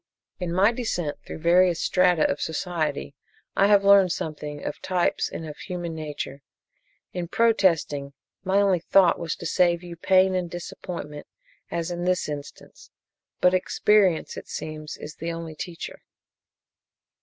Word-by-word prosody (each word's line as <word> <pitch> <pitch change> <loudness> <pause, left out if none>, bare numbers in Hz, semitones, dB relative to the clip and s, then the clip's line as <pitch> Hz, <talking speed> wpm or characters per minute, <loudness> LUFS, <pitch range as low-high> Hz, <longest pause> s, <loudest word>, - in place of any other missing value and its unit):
"In 180 -2 -3
my 190 +5 +4
descent 180 -11 -2
through - - -6
various 170 +1 +4
strata 180 -3 +3
of - - -2
society 160 - -2 0.4
I 195 - +4
have 205 -1 +5
learned 200 -2 +6
something 150 -2 -5
of - - -5
types 180 -2 0
and 160 - -6
of 150 - -8
human 175 -2 -5
nature. 150 -3 -6 0.7
In 180 -1 -3
protesting, 165 -10 +2 0.3
my 195 +1 +2
only 195 -3 +3
thought 180 +1 +4
was 170 -1 -3
to - - -9
save 175 -1 +2
you 175 -1 -8
pain 185 +2 +3
and 180 -2 -1
disappointment 170 -3 -7 0.4
as 170 +1 -3
in 175 0 -3
this 180 0 +1
instance 145 -1 -9 0.5
but 180 0 +5
experience, 185 -1 +2
it - - -8
seems, 155 -1 -6
is 150 - -9
the 165 +1 -3
only 165 -1 -6
teacher. 175 0 -7
175 Hz, 145 wpm, -25 LUFS, 155-185 Hz, 0.7 s, learned